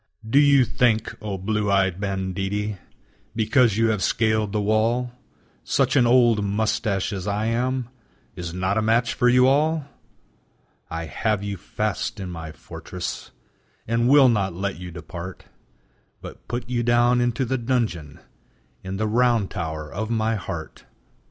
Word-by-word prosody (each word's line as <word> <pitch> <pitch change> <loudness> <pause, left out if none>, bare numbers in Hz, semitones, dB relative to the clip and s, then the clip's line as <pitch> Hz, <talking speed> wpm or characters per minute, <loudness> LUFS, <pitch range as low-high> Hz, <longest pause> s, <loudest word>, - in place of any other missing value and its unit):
Do 135 +6 +4
you 140 -3 +5
think, 115 -3 +1
o 105 -2 -4
blue 105 +2 -1
eyed 95 -1 +1
banditti, 100 +1 -2 0.6
Because 115 0 +3
you 115 0 +3
have 105 -3 0
scaled 110 +1 +1
the 105 - -1
wall, 115 +4 +1 0.5
Such 135 0 +1
an 125 -4 +5
old 120 -3 +4
mustache 100 -1 -1
as 95 0 -5
I 105 +1 -1
am 125 +2 -1 0.5
Is 85 -1 -5
not 95 +4 0
a - - +1
match 115 +2 +2
for 125 - +3
you 125 +1 +5
all! 150 +3 +2 1.0
I 80 0 -4
have 105 +5 -1
you 100 -1 -3
fast 105 +2 -3
in 95 -2 -5
my 80 -2 -7
fortress, 80 +3 -7 0.6
And 115 +2 +1
will 140 -1 +7
not 100 -7 +1
let 95 -1 -3
you 90 0 -7
depart, 85 +2 -8 0.7
But - - -11
put 120 0 -4
you 120 -1 -1
down 120 +1 +3
into 120 +1 0
the 130 +2 -1
dungeon 115 - -2 0.6
In 95 +1 -5
the 110 - -1
round 115 -2 +2
tower 80 -2 -5
of 110 +4 -3
my 110 -1 0
heart. 95 -7 -6
110 Hz, 150 wpm, -23 LUFS, 95-120 Hz, 1.0 s, will